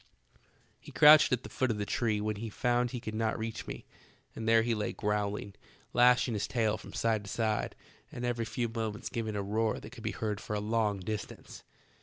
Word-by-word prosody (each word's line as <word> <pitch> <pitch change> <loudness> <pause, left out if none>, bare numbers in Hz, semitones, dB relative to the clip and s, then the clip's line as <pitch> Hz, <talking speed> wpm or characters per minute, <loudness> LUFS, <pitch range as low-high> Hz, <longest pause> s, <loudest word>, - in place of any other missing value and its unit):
"He - - -13
crouched 150 +1 +8
at 125 0 +1
the - - -7
foot 130 - 0
of 110 - 0
the 105 - -2
tree 110 -1 0
when 105 0 -2
he 115 +2 -5
found 120 +2 +1
he 125 - -4
could 110 -2 -6
not 110 0 0
reach 110 0 -5
me, - - -7 0.5
and 115 0 -2
there 115 0 +6
he 120 0 +1
lay 105 -2 -2
growling, 105 -1 -2 0.4
lashing 125 0 +5
his 105 - -1
tail 110 -3 +1
from - - -10
side 110 -2 0
to - - -8
side, 110 0 -1 0.4
and 120 - -5
every 120 -1 -1
few 120 +1 -2
moments 110 -2 -4
giving 110 -2 -3
a 100 - -1
roar 110 +2 0
that 105 - -11
could 120 -2 -11
be 110 - -2
heard 105 -2 -3
for 105 - -4
a - - 0
long 105 -2 0
distance. 105 +3 -6
110 Hz, 215 wpm, -31 LUFS, 105-115 Hz, 0.5 s, crouched